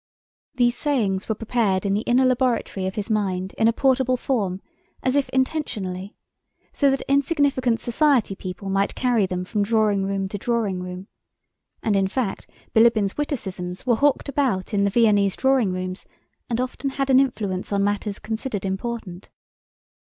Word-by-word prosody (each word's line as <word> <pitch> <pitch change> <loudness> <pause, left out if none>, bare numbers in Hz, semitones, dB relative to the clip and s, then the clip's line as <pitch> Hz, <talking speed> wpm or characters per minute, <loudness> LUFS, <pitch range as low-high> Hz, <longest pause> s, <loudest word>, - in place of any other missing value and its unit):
These 240 -1 +2
sayings 220 -11 0
were 220 - +1
prepared 210 -4 0
in 200 - +1
the 205 - +1
inner 245 +3 +3
laboratory 250 -6 0
of 190 - -4
his 205 -2 -3
mind 190 -3 -1
in 225 - +4
a - - +5
portable 260 0 +2
form 205 -8 -1 0.4
as 255 +1 +1
if 285 -1 +1
intentionally, 215 -9 -2 0.6
so 280 - +3
that 270 0 0
insignificant 275 -4 +2
society 250 -4 +2
people 190 +1 -7
might 195 +1 0
carry 240 -6 +2
them 180 0 -3
from 210 +2 -1
drawing 210 -2 +2
room 195 0 -1
to 205 - -5
drawing 215 -5 -1
room. 180 +1 -7 0.8
And, 215 - +1
in 195 -1 +2
fact, 210 -1 -3 0.2
Bilíbin's 220 -3 +4
witticisms 190 -11 -4
were 250 - +3
hawked 285 +5 +2
about 255 -10 -1
in 200 -1 +2
the - - +2
Viennese 205 -3 +3
drawing 265 -7 +2
rooms 185 +1 -5 0.4
and 235 0 -1
often 255 +2 -2
had 270 0 -1
an 260 - +7
influence 210 -9 -1
on 200 -1 +1
matters 205 0 -1
considered 220 -2 -4
important. 195 -1 -5
220 Hz, 160 wpm, -23 LUFS, 195-255 Hz, 0.8 s, an